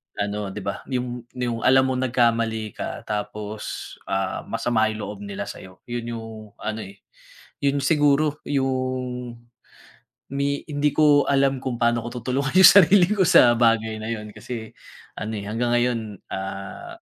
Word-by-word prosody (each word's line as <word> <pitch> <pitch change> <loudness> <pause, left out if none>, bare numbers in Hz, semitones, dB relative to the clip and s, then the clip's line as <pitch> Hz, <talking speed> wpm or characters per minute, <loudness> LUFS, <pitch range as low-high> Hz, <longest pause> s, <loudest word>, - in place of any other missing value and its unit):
ano, 105 0 -2
di 105 0 -7
ba, 100 - -3
yung 125 -2 -4
yung 120 -2 -2
alam 130 0 +5
mong 130 0 0
nagkamali 115 -3 +1
ka - - -5
tapos 105 0 -5 0.2
ah 95 -1 -2
masama 110 -2 +1
yung 110 0 -6
loob 105 -1 -6
nila 100 0 -5
sa'yo. 95 -2 -11
Yun 120 -1 -4
yung 115 0 -7 0.3
ano 110 0 -4
eh, 100 +1 -13 0.6
yun 140 0 +2
siguro 145 +1 +2
yung 130 -3 -2 1.0
ni 140 0 -1
hindi 145 0 +1
ko 145 -2 +5
alam 135 -1 +3
kung 125 -3 -3
paano 120 0 +2
ko - - -5
tutulungan 135 +5 -1
yung 190 - +11
sarili 180 0 +6
ko 200 -3 +3
sa 120 -6 +7
bagay 115 -2 +2
na - - -5
yun 105 -1 -6
kasi 110 +1 -7 0.5
ano 110 +1 -4
eh, - - -6
hanggang 120 +3 -1
ngayon, 120 -1 +2 0.3
ah, 95 - -6
120 Hz, 155 wpm, -23 LUFS, 110-135 Hz, 1.0 s, yung